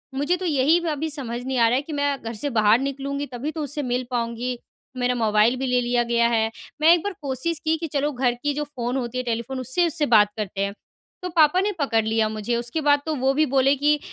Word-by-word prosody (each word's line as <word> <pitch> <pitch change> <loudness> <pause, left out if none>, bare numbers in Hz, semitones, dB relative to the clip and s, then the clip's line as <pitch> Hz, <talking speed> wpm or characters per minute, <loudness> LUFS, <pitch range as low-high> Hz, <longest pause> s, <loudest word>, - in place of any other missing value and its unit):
मुझे 290 +6 +1
तो 370 - -5
यही 305 +1 +3
अभी 310 +1 -2
समझ 250 -5 -5
नहीं 260 0 -2
आ 230 -1 +5
रहा 235 - +2
है 265 - +1
कि 300 +1 -8
मैं 285 -1 0
घर 230 0 -5
से 230 +6 -3
बाहर 215 -2 +4
निकलूँगी 275 +1 -3
तभी 260 +6 -3
तो 315 -1 -4
उससे 290 +1 -3
मिल 250 0 -1
पाऊँगी। 240 +1 -2 0.4
मेरा 250 0 +1
मोबाइल 220 +1 +3
भी 265 - -1
ले 250 0 +2
लिया 240 0 +1
गया 235 0 +2
है। 225 -1 +1 0.3
मैं 330 +2 +7
1 350 - +3
बार 410 - -3
कोशिश 285 +4 -2
की 315 +1 +2
कि 325 +1 -4
चलो 290 +1 0
घर 250 -2 0
की 290 - +1
जो 295 +1 -2
फ़ोन 255 -3 -4
होती 250 -1 -4
है 255 - -1
टेलीफ़ोन 240 +2 -3
उससे 260 +8 +1
उससे 310 -2 0
बात 215 -5 +5
करते 195 -2 -4
हैं। 200 - -4 0.5
तो 360 - -3
पापा 325 0 +4
ने 410 +2 0
पकड़ 230 -6 +1
लिया 220 0 +1
मुझे 215 +2 -2
उसके 240 +7 -2
बाद 290 0 +4
तो 315 - -1
वो 265 0 +1
भी 305 +3 +2
बोले 275 0 +3
कि, 295 +2 +2
260 Hz, 250 wpm, -23 LUFS, 235-295 Hz, 0.5 s, मैं